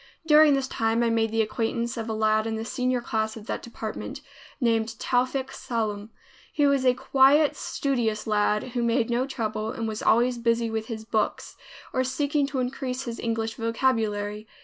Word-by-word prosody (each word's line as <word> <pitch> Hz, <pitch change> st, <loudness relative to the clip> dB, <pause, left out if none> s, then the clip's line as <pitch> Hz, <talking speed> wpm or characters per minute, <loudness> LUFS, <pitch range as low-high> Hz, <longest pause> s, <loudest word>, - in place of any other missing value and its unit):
During 305 Hz, -2 st, +7 dB
this 270 Hz, -1 st, -1 dB
time 225 Hz, -1 st, 0 dB
I 230 Hz, -, +2 dB
made 225 Hz, -1 st, +2 dB
the 225 Hz, 0 st, +2 dB
acquaintance 230 Hz, +1 st, -2 dB
of 225 Hz, -1 st, -4 dB
a -, -, -1 dB
lad 215 Hz, 0 st, +2 dB
in 225 Hz, -, -2 dB
the 220 Hz, 0 st, -4 dB
senior 250 Hz, +3 st, -1 dB
class 220 Hz, -1 st, -2 dB
of 215 Hz, -, -10 dB
that -, -, -3 dB
department, 225 Hz, -2 st, -6 dB, 0.4 s
named 230 Hz, -3 st, +1 dB
Towfik 255 Hz, +2 st, 0 dB
Sallum. 215 Hz, -3 st, -3 dB, 0.4 s
He 295 Hz, -, +2 dB
was 275 Hz, -2 st, +3 dB
a 250 Hz, -, +5 dB
quiet, 275 Hz, +4 st, +4 dB
studious 235 Hz, -6 st, -1 dB
lad, 210 Hz, +2 st, +1 dB
who 245 Hz, 0 st, -2 dB
made 235 Hz, 0 st, +1 dB
no 250 Hz, +3 st, +1 dB
trouble 220 Hz, -4 st, -3 dB
and 225 Hz, 0 st, -3 dB
was 215 Hz, -1 st, -4 dB
always 240 Hz, +2 st, +3 dB
busy 230 Hz, -1 st, +1 dB
with 220 Hz, 0 st, -3 dB
his 220 Hz, -2 st, -6 dB
books 220 Hz, -1 st, -1 dB, 0.4 s
or 255 Hz, -, +2 dB
seeking 285 Hz, +2 st, 0 dB
to 280 Hz, -1 st, -4 dB
increase 255 Hz, 0 st, -2 dB
his 235 Hz, -3 st, -6 dB
English 225 Hz, -1 st, -2 dB
vocabulary. 220 Hz, -3 st, -1 dB
230 Hz, 180 wpm, -26 LUFS, 220-255 Hz, 0.4 s, During